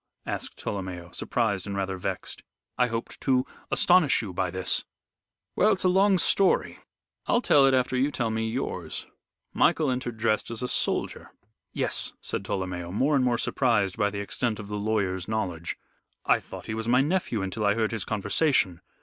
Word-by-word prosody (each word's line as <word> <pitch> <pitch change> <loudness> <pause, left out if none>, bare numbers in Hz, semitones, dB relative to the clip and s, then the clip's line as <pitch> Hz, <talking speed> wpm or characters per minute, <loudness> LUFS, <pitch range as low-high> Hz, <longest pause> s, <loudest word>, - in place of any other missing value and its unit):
asked - - -4
Tolomeo, 90 -3 -5
surprised 100 -6 -1
and 100 -1 -3
rather 95 -1 -1
vexed. 90 - -5 0.3
"I 125 - +3
hoped 115 -1 -5
to 130 -1 +2 0.2
astonish 175 -10 +4
you 95 -4 -6
by 90 +1 -1
this." 95 +1 -1 0.7
"Well, 215 - +4
it's - - -2
a 185 - +4
long 195 +1 +4
story. 190 +3 +2 0.5
I'll 240 - +3
tell 145 - +5
it 135 - +4
after 130 0 +1
you 130 +3 +2
tell 120 -6 -1
me 110 0 -1
yours. 125 +4 -4 0.5
Michael 150 -4 +3
entered 125 -2 -3
dressed 110 -1 0
as 115 +1 -4
a - - 0
soldier." - - -1 0.4
"Yes," - - -1
said - - -4
Tolomeo, 90 -2 -3
more 135 +9 +2
and 135 - +3
more 120 -2 +2
surprised 115 -7 +1
by 105 -2 +1
the 100 0 -4
extent 110 +2 -1
of 100 -1 -8
the 105 - -3
lawyer's 100 -4 -1
knowledge. 90 -7 -3 0.5
"I - - +4
thought - - -10
he 110 - -4
was 110 +1 -3
my 125 +2 +4
nephew 145 - 0
until 95 +3 -3
I 100 0 +3
heard 110 -1 0
his 115 -4 -2
conversation. 105 - +1
110 Hz, 180 wpm, -27 LUFS, 100-130 Hz, 0.7 s, tell